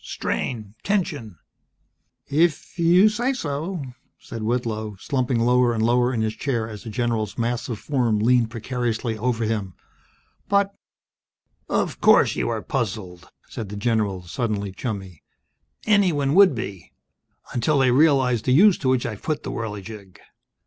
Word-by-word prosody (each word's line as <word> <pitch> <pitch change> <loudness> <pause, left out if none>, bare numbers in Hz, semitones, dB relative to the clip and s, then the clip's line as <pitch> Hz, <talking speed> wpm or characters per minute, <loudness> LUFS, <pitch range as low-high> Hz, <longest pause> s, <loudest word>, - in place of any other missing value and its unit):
Strain. 110 -5 -4
Tension." 165 - -2 0.9
"If 160 +3 +3
If 160 - -18
you 175 +4 +6
say 240 +5 0
so 165 - -4 0.2
..." - - -45
said 115 - -8
Whitlow, 110 -2 -2
slumping 130 -2 -1
lower 120 0 +3
and 110 - 0
lower 120 +2 +3
in 115 -3 -1
his 110 0 -2
chair 115 -2 -2
as 110 -1 -9
the 115 - -7
general's 110 -2 -2
massive 120 -1 -2
form 120 -4 0
leaned 115 +1 +3
precariously 115 -1 -2
over 115 +1 -1
him. 105 -5 -2 0.7
"But 200 0 +2 0.5
" - - -48
"Of - - -8
course - - +5
you - - -1
are - - -3
puzzled," 95 -6 -4 0.2
said 110 -4 -7
the 105 - -6
general, 105 -4 0
suddenly 100 +1 -3
chummy. 95 - -6 0.6
"Anyone 175 -10 +2
would 190 -4 +6
be. 100 -7 -7 0.6
Until 125 +5 +1
they 130 -2 +4
realized 130 -4 +3
the 125 - +3
use 195 +6 +6
to 130 - 0
which 130 -2 +1
I've 110 -4 -5
put 155 -2 -2
the - - -4
Whirligig!" 105 -3 -7
120 Hz, 150 wpm, -23 LUFS, 110-140 Hz, 0.9 s, you